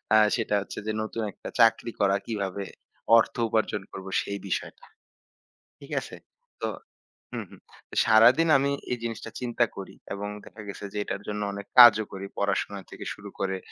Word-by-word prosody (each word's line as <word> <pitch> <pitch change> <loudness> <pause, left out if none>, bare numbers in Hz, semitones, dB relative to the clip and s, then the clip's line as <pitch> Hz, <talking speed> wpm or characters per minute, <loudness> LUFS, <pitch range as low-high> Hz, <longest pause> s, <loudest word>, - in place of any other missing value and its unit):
আ - - +8 0.2
সেটা 115 -3 0
হচ্ছে 100 - -7
যে - - +1
নতুন 110 +1 -4
একটা - - -9
চাকরি 115 0 +4
করা। 100 -1 +3
কিভাবে 100 -3 -3 0.5
অর্থ 115 - +2
উপার্জন 110 -2 0
করবো 95 0 -8
সেই 100 0 -5
বিষয়টা। 95 - -4 0.9
ঠিক - - -13
আছে? - - -9 0.5
তো - - 0 0.7
হুম, - - -4
হুম। - - -15 0.4
সারাদিন 120 +9 +6
আমি 140 +1 +1 0.2
এই 125 - -1
জিনিসটা 115 -2 -5
চিন্তা 120 -1 +1
করি 95 - -8 0.2
এবং 100 +1 -4 0.2
দেখা 105 - -11
গেছে 100 - -7
যে 105 - -4
এটার 100 0 -4
জন্য 105 0 -3
অনেক 100 0 -7
কাজও 110 -3 +10
করি 95 0 -6
পড়াশোনা 100 0 -1
থেকে - - -8
শুরু 100 - -11
করে 95 -1 -1
105 Hz, 165 wpm, -27 LUFS, 100-115 Hz, 0.9 s, কাজও